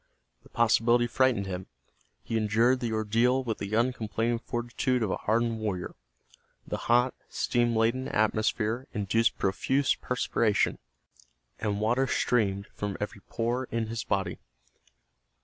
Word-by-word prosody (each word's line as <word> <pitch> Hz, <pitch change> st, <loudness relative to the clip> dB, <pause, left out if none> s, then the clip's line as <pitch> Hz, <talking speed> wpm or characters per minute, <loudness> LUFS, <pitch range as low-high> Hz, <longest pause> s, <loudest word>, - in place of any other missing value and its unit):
The -, -, -19 dB
possibility 120 Hz, +1 st, +3 dB
frightened 120 Hz, -3 st, +2 dB
him. 95 Hz, -1 st, -5 dB, 0.6 s
He 115 Hz, -, -4 dB
endured 115 Hz, +4 st, +3 dB
the 120 Hz, -2 st, -2 dB
ordeal 115 Hz, +4 st, +2 dB
with 115 Hz, -3 st, -3 dB
the 100 Hz, +2 st, -3 dB
uncomplaining 115 Hz, -1 st, 0 dB
fortitude 120 Hz, +1 st, -1 dB
of 100 Hz, -, -1 dB
a -, -, 0 dB
hardened 115 Hz, +1 st, 0 dB
warrior. 100 Hz, -5 st, -3 dB, 0.7 s
The -, -, -3 dB
hot, 125 Hz, +2 st, +4 dB, 0.2 s
steam 120 Hz, -1 st, +1 dB
laden 115 Hz, +4 st, +1 dB
atmosphere 110 Hz, +3 st, 0 dB
induced 105 Hz, +2 st, +1 dB
profuse 135 Hz, +8 st, +1 dB
perspiration, 115 Hz, -4 st, 0 dB, 0.8 s
and 105 Hz, -2 st, -1 dB
water 120 Hz, +5 st, +2 dB
streamed 100 Hz, -7 st, +1 dB
from 100 Hz, -2 st, -4 dB
every 105 Hz, -1 st, -5 dB
pore 120 Hz, +3 st, -1 dB
in 115 Hz, -2 st, -3 dB
his 115 Hz, -1 st, -3 dB
body. 95 Hz, -1 st, -1 dB
115 Hz, 130 wpm, -28 LUFS, 105-120 Hz, 0.8 s, hot